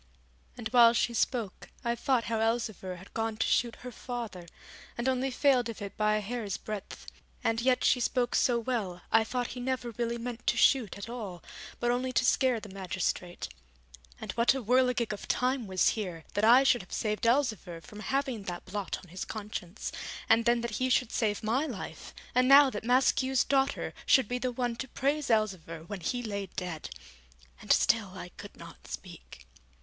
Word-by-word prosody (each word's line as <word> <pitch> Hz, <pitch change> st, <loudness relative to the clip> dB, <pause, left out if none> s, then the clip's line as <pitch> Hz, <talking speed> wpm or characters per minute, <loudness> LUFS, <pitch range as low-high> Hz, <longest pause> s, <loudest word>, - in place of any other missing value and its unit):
And 235 Hz, -3 st, -4 dB
while 235 Hz, -1 st, +7 dB
she 235 Hz, 0 st, +1 dB
spoke 230 Hz, -4 st, -1 dB
I 235 Hz, -, +1 dB
thought 245 Hz, 0 st, +1 dB
how 225 Hz, -1 st, -1 dB
Elzevir 225 Hz, -5 st, -1 dB
had 185 Hz, +2 st, -14 dB
gone 225 Hz, -1 st, -2 dB
to -, -, +1 dB
shoot 235 Hz, -1 st, +1 dB
her 250 Hz, -, -5 dB
father, 230 Hz, -8 st, -6 dB, 0.5 s
and 235 Hz, +2 st, -1 dB
only 260 Hz, 0 st, +1 dB
failed 255 Hz, -2 st, +3 dB
of 230 Hz, -, -6 dB
it 200 Hz, -1 st, -6 dB
by 215 Hz, -1 st, +2 dB
a 215 Hz, -, 0 dB
hair's 210 Hz, -2 st, -3 dB
breadth, 210 Hz, -3 st, -7 dB, 0.4 s
and 225 Hz, 0 st, +1 dB
yet 255 Hz, +1 st, +2 dB
she 250 Hz, -, +4 dB
spoke 245 Hz, 0 st, 0 dB
so 245 Hz, -2 st, +3 dB
well 220 Hz, -7 st, -3 dB
I 225 Hz, -, +5 dB
thought 245 Hz, +2 st, -2 dB
he 250 Hz, -, -7 dB
never 250 Hz, -1 st, -2 dB
really 235 Hz, +1 st, -2 dB
meant 240 Hz, 0 st, -6 dB
to -, -, +3 dB
shoot 245 Hz, -9 st, +3 dB
at 200 Hz, -, -7 dB
all, 210 Hz, -8 st, -6 dB, 0.4 s
but 240 Hz, -, +1 dB
only 255 Hz, +1 st, -1 dB
to 255 Hz, -, +2 dB
scare 255 Hz, -2 st, +3 dB
the 215 Hz, -, -10 dB
magistrate. 185 Hz, -2 st, -3 dB, 0.7 s
And -, -, -5 dB
what 235 Hz, +3 st, +3 dB
a 265 Hz, -, -3 dB
whirligig 250 Hz, -1 st, +2 dB
of 205 Hz, -, -8 dB
time 250 Hz, -2 st, 0 dB
was 185 Hz, -1 st, +3 dB
here, 180 Hz, -7 st, -4 dB
that 205 Hz, -, -1 dB
I 245 Hz, +4 st, +7 dB
should 245 Hz, -3 st, +4 dB
have 180 Hz, -, -16 dB
saved 215 Hz, +1 st, -1 dB
Elzevir 220 Hz, -9 st, +1 dB
from 205 Hz, +6 st, -12 dB
having 255 Hz, 0 st, -2 dB
that 175 Hz, -2 st, -5 dB
blot 200 Hz, +1 st, -3 dB
on 180 Hz, -, -16 dB
his 185 Hz, +3 st, -5 dB
conscience, 210 Hz, -3 st, -6 dB, 0.4 s
and 225 Hz, +1 st, +4 dB
then 235 Hz, 0 st, +3 dB
that 235 Hz, -1 st, -3 dB
he 255 Hz, -, +2 dB
should 250 Hz, -2 st, +2 dB
save 215 Hz, -1 st, 0 dB
my 250 Hz, +8 st, +1 dB
life, -, -, -7 dB, 0.2 s
and 255 Hz, 0 st, +4 dB
now 275 Hz, 0 st, +8 dB
that 210 Hz, -, -5 dB
Maskew's 260 Hz, +1 st, +3 dB
daughter 270 Hz, 0 st, 0 dB
should 265 Hz, -5 st, +5 dB
be 245 Hz, +2 st, -2 dB
the 250 Hz, 0 st, -1 dB
one 245 Hz, -1 st, -2 dB
to 265 Hz, -, -4 dB
praise 280 Hz, +3 st, -1 dB
Elzevir 185 Hz, -8 st, 0 dB
when 200 Hz, +3 st, -6 dB
he 245 Hz, +8 st, -2 dB
lay 200 Hz, -3 st, -3 dB
dead! 175 Hz, -4 st, -5 dB, 0.7 s
And -, -, -2 dB
still -, -, +3 dB
I -, -, -7 dB
could -, -, -12 dB
not -, -, -12 dB
speak. 60 Hz, +2 st, -10 dB
230 Hz, 195 wpm, -30 LUFS, 205-250 Hz, 0.7 s, now